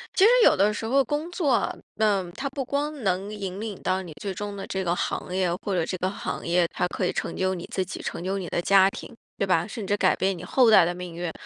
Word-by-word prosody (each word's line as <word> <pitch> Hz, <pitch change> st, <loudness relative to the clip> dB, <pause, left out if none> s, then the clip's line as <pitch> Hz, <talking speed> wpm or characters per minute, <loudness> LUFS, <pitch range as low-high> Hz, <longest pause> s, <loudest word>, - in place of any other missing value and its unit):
其 380 Hz, -, +4 dB
实 -, -, +8 dB
有 -, -, +6 dB
的 205 Hz, +2 st, +3 dB
时 215 Hz, -, -4 dB
候 270 Hz, +4 st, +3 dB
工 295 Hz, +6 st, -2 dB
作 350 Hz, -3 st, -2 dB
啊， 240 Hz, -, +2 dB, 0.3 s
嗯， 200 Hz, -5 st, +1 dB
它 275 Hz, +7 st, -4 dB
不 270 Hz, -1 st, -4 dB
光 285 Hz, 0 st, -2 dB
能 190 Hz, +1 st, 0 dB
引 200 Hz, -2 st, -5 dB
领 215 Hz, -3 st, -5 dB
到 185 Hz, +1 st, 0 dB
你 175 Hz, -3 st, -9 dB
最 200 Hz, -2 st, -4 dB
终 205 Hz, +2 st, -5 dB
的 195 Hz, -, -5 dB
这 190 Hz, 0 st, -3 dB
个 175 Hz, -1 st, 0 dB
行 180 Hz, -, -3 dB
业， 185 Hz, -2 st, +1 dB
或 195 Hz, 0 st, -3 dB
者 170 Hz, -3 st, +1 dB
这 185 Hz, -, -3 dB
个 185 Hz, -, 0 dB
行 195 Hz, -, -5 dB
业 170 Hz, 0 st, +2 dB
它 180 Hz, -, 0 dB
可 185 Hz, -, -2 dB
以 -, -, 0 dB
成 -, -, -3 dB
就 190 Hz, 0 st, +1 dB
你 175 Hz, -2 st, -6 dB
自 190 Hz, -, -1 dB
己， 185 Hz, -, -7 dB
成 -, -, -5 dB
就 195 Hz, +2 st, -1 dB
你 180 Hz, -, -5 dB
的 -, -, -1 dB
家 195 Hz, +2 st, +5 dB
庭， 195 Hz, -, -10 dB, 0.2 s
对 -, -, +1 dB
吧？ 175 Hz, -3 st, +2 dB
甚 215 Hz, -1 st, -6 dB
至 200 Hz, -, +1 dB
改 190 Hz, -2 st, +3 dB
变 190 Hz, 0 st, 0 dB
你 175 Hz, -, -9 dB
后 235 Hz, +5 st, +4 dB
代 215 Hz, -, +8 dB
的 175 Hz, +1 st, -1 dB
命 180 Hz, -1 st, -7 dB
运。 170 Hz, 0 st, -4 dB
190 Hz, 300 characters per minute, -25 LUFS, 180-215 Hz, 0.3 s, 实